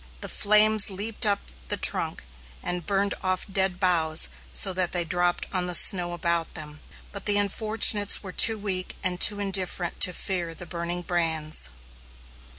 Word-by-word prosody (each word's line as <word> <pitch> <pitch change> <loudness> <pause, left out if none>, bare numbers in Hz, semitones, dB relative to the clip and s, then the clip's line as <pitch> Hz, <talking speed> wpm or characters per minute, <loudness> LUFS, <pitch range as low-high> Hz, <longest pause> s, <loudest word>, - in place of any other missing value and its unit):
The - - -5
flames 215 0 +2
leaped 210 +3 -2
up 200 -1 +1 0.3
the - - -2
trunk, - - -2 0.4
and 175 -2 -6
burned 200 0 -1
off 185 -1 -3
dead 190 -2 -2
boughs 165 -4 +2 0.2
so 190 - +4
that 180 -1 -3
they 175 -1 +1
dropped 175 +1 -1
on 180 -1 -2
the 180 - -3
snow 175 -1 +6
about 170 -1 -3
them, 150 -2 -7 0.3
but 200 0 -8
the 205 -1 +1
unfortunates 205 0 +2
were 190 - -8
too 225 +4 +4
weak 190 -3 -2
and 180 -2 -2
too 205 -1 +4
indifferent 190 -3 -3
to 180 - +3
fear 175 -2 -3
the 175 - -10
burning 170 +1 -5
brands. 160 - +2
185 Hz, 160 wpm, -24 LUFS, 175-200 Hz, 0.4 s, snow